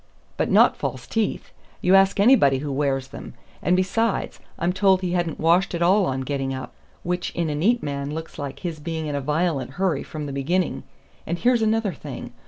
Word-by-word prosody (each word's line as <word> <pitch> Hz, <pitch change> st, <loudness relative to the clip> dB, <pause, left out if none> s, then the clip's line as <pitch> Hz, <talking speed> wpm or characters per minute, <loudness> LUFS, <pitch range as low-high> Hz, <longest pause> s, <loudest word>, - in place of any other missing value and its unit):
"But -, -, -1 dB
not -, -, +5 dB
false -, -, -4 dB
teeth. 225 Hz, -2 st, -2 dB, 0.3 s
You 180 Hz, -, +2 dB
ask 195 Hz, +1 st, +5 dB
anybody 200 Hz, -, +5 dB
who 145 Hz, +2 st, -4 dB
wears 135 Hz, -1 st, -1 dB
them. 140 Hz, -, -10 dB, 0.3 s
And 180 Hz, -, +2 dB
besides, 195 Hz, +4 st, 0 dB, 0.2 s
I'm 175 Hz, +2 st, 0 dB
told 190 Hz, 0 st, +3 dB
he 180 Hz, -2 st, -2 dB
hadn't 175 Hz, -3 st, -1 dB
washed 175 Hz, +3 st, +3 dB
at 170 Hz, -, 0 dB
all 190 Hz, +2 st, +4 dB
on 130 Hz, 0 st, -2 dB
getting 135 Hz, 0 st, -2 dB
up, 130 Hz, -, -7 dB, 0.3 s
which 180 Hz, 0 st, -2 dB
in 165 Hz, -3 st, -1 dB
a -, -, -1 dB
neat 225 Hz, +11 st, +2 dB
man 140 Hz, -1 st, -3 dB
looks 160 Hz, +1 st, -7 dB
like 140 Hz, -2 st, -6 dB
his 170 Hz, -4 st, -4 dB
being 160 Hz, +1 st, -4 dB
in 150 Hz, -, -3 dB
a 140 Hz, -, -1 dB
violent 150 Hz, -2 st, -1 dB
hurry 180 Hz, -5 st, 0 dB
from 155 Hz, -1 st, -6 dB
the 140 Hz, -, -5 dB
beginning. 170 Hz, +7 st, -1 dB, 0.5 s
And 170 Hz, -, -1 dB
here's 240 Hz, +3 st, +2 dB
another 220 Hz, -3 st, +1 dB
thing. -, -, -8 dB
170 Hz, 200 wpm, -23 LUFS, 140-190 Hz, 0.5 s, not